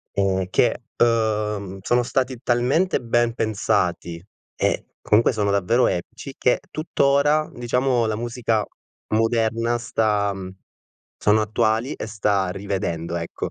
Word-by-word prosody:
E 95 -2 +1
che, - - +2 0.2
uhm, 105 -4 +1
sono 120 +5 +2
stati 130 +1 -1
talmente 130 +10 +1
ben 120 0 +1
pensati 100 -6 -1 0.4
e - - 0
comunque 110 +4 +3
sono 105 -3 0
davvero 100 +6 +2
epici, 115 +9 -4
che 125 - +2
tuttora 150 0 +2
diciamo 125 0 +1
la 110 -1 -1
musica 115 -2 -1 0.5
moderna 115 +1 +1
sta 105 -3 0 0.9
sono 105 +1 +3
attuali 110 +4 0
e - - -6
sta 105 -3 0
rivedendo, 90 -4 -3
ecco. 85 0 -4
110 Hz, 115 wpm, -22 LUFS, 100-120 Hz, 0.9 s, comunque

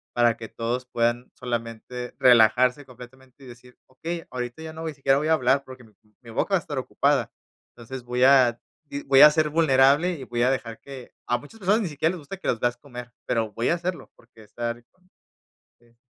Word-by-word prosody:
para 120 -1 +3
que 115 - -8
todos 120 +2 -3
puedan 120 +1 -1
solamente 120 0 -5
relajarse 125 +3 +5
completamente 130 +2 -15
y - - -12
decir: 125 +1 -15
"Okey 165 +6 -6
ahorita 125 +4 -5
ya 160 0 -7
no 160 - -9
voy 160 -2 -4
siquiera 135 0 +2
voy 150 - -2
a - - +5
hablar 135 -2 +2
porque 130 -1 -12
mi 110 - -22 0.3
mi 115 - -11
boca - - 0
va - - +5
a - - -4
estar - - -7
ocupada", - - 0 0.4
entonces, 120 +2 -9
voy 125 +1 -1
a 130 -3 +5 0.5
voy 135 0 +6
a 150 0 +10
ser 155 0 +1
vulnerable 150 +2 +4
y 135 -4 -9
voy 120 0 -1
a 130 - +3
dejar 115 -4 -4
que 135 -3 -11
a 120 - +1
muchas 145 - -14
personas 210 +5 +2
ni 190 - -2
siquiera 150 +1 0
les 180 - -7
gusta 150 +6 -8
que - - -8
los 115 - 0
veas 120 +1 0
comer 125 -2 -10
pero 115 -3 -1
voy 115 +3 -1
a - - +3
hacerlo 175 +1 -5
porque 115 -2 -19
estar 120 +2 -5
con 185 0 -33 0.7
este 120 0 -28
125 Hz, 215 wpm, -24 LUFS, 120-145 Hz, 0.7 s, a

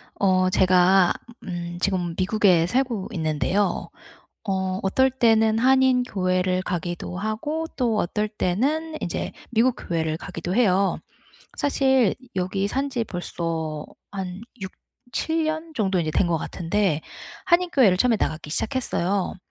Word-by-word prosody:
어. 185 -1 +3
제가 185 0 +4 0.3
음 175 -1 -5
지금 180 -3 0
미국에 185 -3 +3
살고 245 -3 -1
있는데요. 160 +5 0 0.6
어 190 0 -1
어떨 260 +7 +3
때는 225 -3 +3
한인 260 0 +4
교회를 185 -4 0
가기도 175 0 -4
하고 220 - -2
또 235 -4 +1
어떨 210 +3 -1
때는 280 - -1
이제 - - -3 0.2
미국 240 +2 +3
교회를 160 -2 -2
가기도 175 +2 -5
해요. 195 -4 +3 0.6
사실 265 -6 +2 0.2
여기 190 +2 -1
산 270 +6 -1
지 245 -3 -1
벌써 165 -5 -4 0.3
한 190 -1 -5 0.7
6-7 320 +4 0
년 315 +1 -3
정도 195 -5 +1
인제 155 -2 -1
된 175 - +2
것 170 -1 +1
같은데 170 0 -1 0.4
한인 355 0 +3
교회를 210 -10 +4
처음에 235 +3 +3
나가기 155 -1 -2
시작했어요. 200 - -1
195 Hz, 250 characters per minute, -24 LUFS, 180-250 Hz, 0.7 s, 제가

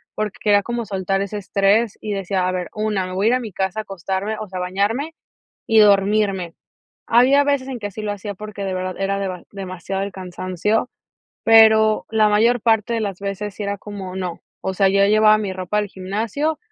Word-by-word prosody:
porque 215 -2 -3
quería 205 -1 +3
como 235 +1 -3
soltar 195 -1 -1
ese 200 +1 -4
estrés 200 +3 +1
y 215 - -4
decía: 195 -1 -1
"A 185 - 0
ver, 180 -1 -3
una, 210 -3 -1
me 185 - -6
voy 195 +3 +1
a - - +5
ir - - +3
a - - 0
mi 225 -5 -7
casa 190 +2 -2
a - - -2
acostarme, 195 +2 -3
o 215 - -6
sea, 185 - -5
bañarme 205 - -1 0.5
y 225 -1 +5
dormirme". 200 -3 +3 0.5
Había 260 +5 +5
veces 280 -2 0
en 255 - -4
que 205 - -5
así 205 +2 -7
lo 210 - -2
hacía, 205 0 -6
porque, 210 0 -7
de 190 -1 -2
verdad 185 0 -3
era 195 0 -1
deba 185 -3 -4
demasiado 190 -1 -5
el 200 - -3
cansancio, 185 +4 -2 0.5
pero, 220 -1 +6
la 220 -1 +3
mayor 230 +4 +3
parte 225 +1 +2
de 230 - -1
las 200 -4 -3
veces 200 0 -4
sí 210 - -4
era 200 0 -3
como 195 -2 -7
no, 180 -3 -4 0.2
o 190 - -3
sea, 195 +1 +3
yo 200 +1 +4
llevaba 215 +1 +5
mi 205 -3 -3
ropa 185 +2 -2
al 210 -1 -1
gimnasio 220 +12 -2
205 Hz, 210 wpm, -21 LUFS, 190-220 Hz, 0.5 s, pero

